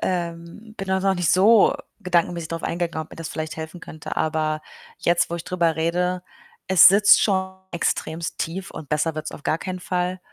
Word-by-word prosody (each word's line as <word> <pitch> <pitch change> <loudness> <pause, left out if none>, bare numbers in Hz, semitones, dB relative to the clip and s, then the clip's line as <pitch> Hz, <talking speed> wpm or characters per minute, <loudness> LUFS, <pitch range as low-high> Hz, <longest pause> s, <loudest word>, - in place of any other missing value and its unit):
ähm, 175 +4 -4
bin 195 0 -5
da 190 0 +1
noch 195 0 +2
nicht 175 -2 +1
so 210 +4 +5 0.3
gedankenmäßig 175 -3 0
drauf 165 0 -5
eingegangen, 170 -2 -2
ob - - -23
mir - - -10
das 165 -1 -6
vielleicht 155 0 -5
helfen 160 +2 -7
könnte. 155 -2 -8
Aber 155 -1 0 0.4
jetzt, 170 0 +2
wo - - -2
ich 170 - -7
drüber 170 -3 0
rede, 180 +3 0 0.4
es 190 -3 +8
sitzt 205 +2 +6
schon 190 -2 0 0.2
extrem 170 -1 -2
tief 180 +3 -4
und 160 -3 -9
besser 150 +1 0
wird's 155 - -5
auf - - -10
gar 160 - 0
keinen 185 0 -5
Fall, 180 0 -2
170 Hz, 190 wpm, -23 LUFS, 160-185 Hz, 0.4 s, es